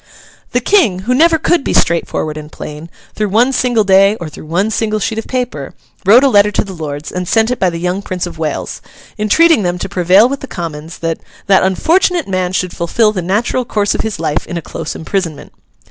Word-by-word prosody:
The 245 - +1
King, 245 - +2
who 245 +5 0
never 325 +5 +4
could 340 -1 +1
be - - -2
straightforward 165 -2 0
and 155 0 -9
plain, 150 +2 -8 0.2
through 210 -1 -2
one 240 +6 +3
single 245 -3 +2
day 195 +1 +4
or 170 -7 -7
through 155 - -12
one 190 +7 0
single 215 0 -1
sheet 220 +1 -2
of 225 - -7
paper, 245 - -4 0.3
wrote 235 +6 +7
a - - +5
letter 205 -5 +4
to - - +1
the 195 -2 -8
Lords, 150 -3 -6
and 180 -1 -4
sent 225 +4 +2
it 250 - -2
by 185 - +2
the 170 - -5
young 180 +3 -2
Prince 185 -2 -4
of 165 -2 -9
Wales, 155 -2 -3 0.4
entreating 315 +7 +4
them 175 -2 -1
to - - -4
prevail 185 +5 +4
with 275 +1 -4
the 275 - -8
Commons 165 - -6
that 165 -1 -3 0.3
'that 195 -2 +4
unfortunate 335 - +1
man 185 -2 -1
should 185 -1 -2
fulfil 210 +6 +1
the 190 -4 -3
natural 210 +8 0
course 210 -3 0
of - - -1
his 220 -6 -4
life 150 -2 -2
in 175 - -4
a - - -3
close 155 0 -6
imprisonment. 165 -1 -4
195 Hz, 220 wpm, -15 LUFS, 170-230 Hz, 0.4 s, wrote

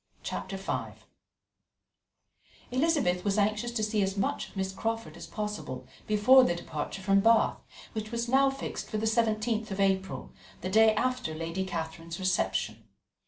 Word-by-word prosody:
Chapter 195 - -4
V 195 - -3 1.8
Elizabeth 260 - +2
was 200 0 +1
anxious 210 +3 +1
to 220 -2 -1
see 210 0 +1
as 195 0 0
much 195 - -1
of - - -14
Miss 190 0 -1
Crawford 225 -4 -3
as 170 -1 -9
possible 210 +3 -5 0.2
before 215 +5 +7
their 175 - +2
departure 170 +3 -5
from 195 0 +4
Bath, 225 +3 +4 0.3
which 215 -1 -4
was 235 0 -2
now 270 +2 +5
fixed 270 0 -5
for 215 - -2
the 215 - -1
17th 220 0 +1
of 195 0 -4
April, 190 -1 0 0.3
the 185 - -3
day 220 +1 +6
after 255 -7 -1
Lady 165 +4 -3
Catherine's 165 -2 -5
reception. 110 - 0
210 Hz, 155 wpm, -29 LUFS, 185-225 Hz, 1.8 s, before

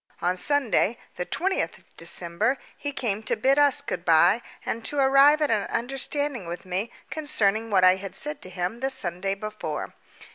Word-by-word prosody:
On 180 +1 0
Sunday, 240 0 +2 0.2
the 180 - -4
20th 380 +2 -1
of - - -27
December, 170 +8 0 0.2
he 290 - -4
came 220 -6 -2
to - - -1
bid 270 +5 +2
us 285 -2 +5
good 170 - -4
bye 175 +6 +4 0.2
and 230 - -3
to 290 - -2
arrive 275 +3 +5
at 295 - +1
an 210 -3 0
understanding 270 - -2
with 175 +2 -7
me 185 +5 -2 0.2
concerning 225 -8 0
what 190 -3 +3
I 185 0 +6
had 195 0 -7
said 295 -1 -2
to 185 - -8
him 180 +5 -4
the 265 +1 -1
Sunday 195 -5 -2
before. 210 -7 -5
220 Hz, 180 wpm, -25 LUFS, 185-275 Hz, 0.2 s, I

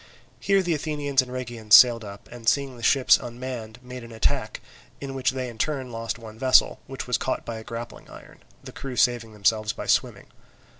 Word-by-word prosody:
Here 195 -1 +2
the 175 -2 0
Athenians 145 -3 0
and 125 -1 -9
Rhegians 120 -4 +2
sailed 120 -2 +7
up, 100 -1 -10
and 120 -1 0
seeing 140 -1 -1
the 120 - -12
ships 130 +2 +4
unmanned, 120 -2 -7
made 125 -1 -9
an 115 - -11
attack, 110 -1 -1 0.4
in 135 -1 -6
which 130 -1 0
they 130 0 -3
in 120 -2 -9
their - - +2
turn 135 -5 -4
lost 115 0 -4
one 110 -1 -12
vessel, 130 0 +4
which 135 -1 -6
was 125 0 0
caught 130 - -2
by 115 - -5
a - - -10
grappling 115 +1 -8
iron, - - -14 0.2
the - - -9
crew 135 -2 -7
saving 120 -2 +1
themselves 105 +1 +1
by - - -7
swimming. - - 0
125 Hz, 205 wpm, -25 LUFS, 115-130 Hz, 0.4 s, sailed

